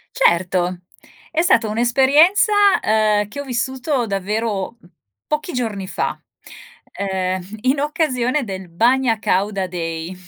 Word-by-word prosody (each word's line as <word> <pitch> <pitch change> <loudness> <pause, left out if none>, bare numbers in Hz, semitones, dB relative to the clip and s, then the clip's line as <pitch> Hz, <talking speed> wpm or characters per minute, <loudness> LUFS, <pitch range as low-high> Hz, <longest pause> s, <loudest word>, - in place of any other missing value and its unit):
Certo, 175 +1 +1 0.5
è 325 - +1
stata 235 -10 +3
un'esperienza, 270 - +4 0.3
ehm, 215 -1 +2
che 275 +7 -8
ho - - -3
vissuto 260 +1 -2
davvero, 205 +1 -2
mhmm, 175 - -21 0.4
pochi 305 +3 -2
giorni 220 -6 -3
fa, - - -3 0.7
ehm, 185 -2 -2 0.2
in 260 +4 +1
occasione 285 -3 0
del 190 -4 -7
Bagna 235 +6 +2
Càuda 195 -1 0
Day, 165 -1 -5
220 Hz, 115 wpm, -20 LUFS, 190-265 Hz, 0.7 s, un'esperienza